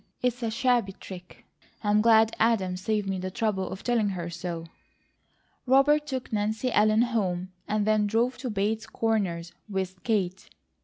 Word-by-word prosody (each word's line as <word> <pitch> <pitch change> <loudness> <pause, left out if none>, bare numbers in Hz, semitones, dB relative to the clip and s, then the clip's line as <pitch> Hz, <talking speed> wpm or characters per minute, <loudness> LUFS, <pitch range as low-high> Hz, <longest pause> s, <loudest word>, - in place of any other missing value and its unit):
It's 250 0 0
a 230 - 0
shabby 235 -3 +1
trick. 185 -1 -11 0.4
I'm 210 0 +3
glad 225 0 +5
Adam 210 -5 +2
saved 205 +2 -1
me 190 -1 -1
the 185 +1 -3
trouble 195 -1 -1
of 190 - -7
telling 230 -4 +1
her 175 -3 -4
so." 170 -1 -5 1.0
Robert 295 +3 +4
took 260 -5 -4
Nancy 215 +4 0
Ellen 215 +1 +4
home, 190 -6 -1 0.2
and 210 -1 0
then 215 -1 +3
drove 235 +5 0
to 255 -1 -3
Bates 215 +1 -1
Corners 185 -7 -1 0.2
with 190 -2 -3
Kate. 195 -5 -1
215 Hz, 155 wpm, -27 LUFS, 190-230 Hz, 1.0 s, glad